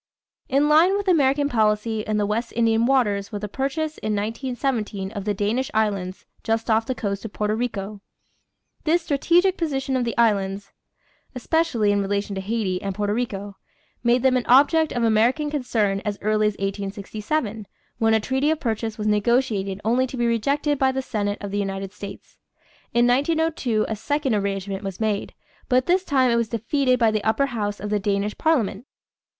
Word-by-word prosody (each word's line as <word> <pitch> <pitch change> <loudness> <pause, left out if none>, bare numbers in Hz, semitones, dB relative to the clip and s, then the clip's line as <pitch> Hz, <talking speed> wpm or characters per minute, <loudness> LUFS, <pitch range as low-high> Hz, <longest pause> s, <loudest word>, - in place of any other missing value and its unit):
In 280 +2 +3
line 330 +6 +5
with 405 -1 -4
American 285 -4 +3
policy 220 -2 +1
in 215 0 -2
the 205 - +1
West 220 +4 -2
Indian 230 0 +2
waters 210 -7 +1
was 205 -2 -5
the 210 - -3
purchase 300 +7 -3
in 215 -1 -1
1917 225 -2 -2
of 200 -3 -6
the 210 -1 0
Danish 220 +7 -1
Islands 200 -4 -1 0.2
just 225 0 0
off 225 +1 +2
the 260 - -1
coast 200 -4 -3
of 225 - -7
Porto 210 0 -1
Rico. 215 -3 -3 0.8
The 330 +2 +3
strategic 345 +4 +2
position 270 -5 -1
of 255 - +1
the 235 -1 -3
islands, 200 -3 +1 0.6
especially 250 -6 +1
in 205 0 +1
relation 200 +1 -2
to 190 - -3
Haiti 195 -3 -2
and 195 -1 -4
Porto 205 0 -1
Rico, 205 -4 -4 0.5
made 240 +1 +3
them 260 -1 +4
an 245 - -2
object 295 +5 +5
of 240 - -1
American 235 +7 +2
concern 220 -8 0
as 205 -1 -3
early 215 0 +2
as 210 - 0
1867, 205 +4 -3 0.3
when 225 0 +3
a - - +3
treaty 265 +6 0
of 315 -1 0
purchase 225 -3 -2
was 210 - -4
negotiated 210 -2 +1
only 250 +3 +2
to 255 - -7
be 240 - +1
rejected 280 +5 0
by 265 -1 +3
the 265 0 -3
Senate 205 -4 -2
of 200 -1 -5
the 205 - -1
United 195 -1 -4
States. 200 -1 -10 0.5
In 240 0 +3
1902 275 -3 +1
a 220 - -2
second 285 +3 -1
arrangement 195 -1 -2
was 195 -2 -5
made, 215 -2 -2 0.3
but 255 0 +3
this 365 +2 +2
time 260 -7 +2
it 235 - +3
was 230 -2 0
defeated 255 +3 +1
by 230 -3 +3
the 215 -1 -1
upper 220 +6 +2
house 210 -6 -3
of 210 +1 -5
the 210 - +2
Danish 200 +1 -1
parliament. 250 -7 0
225 Hz, 185 wpm, -23 LUFS, 205-265 Hz, 0.8 s, line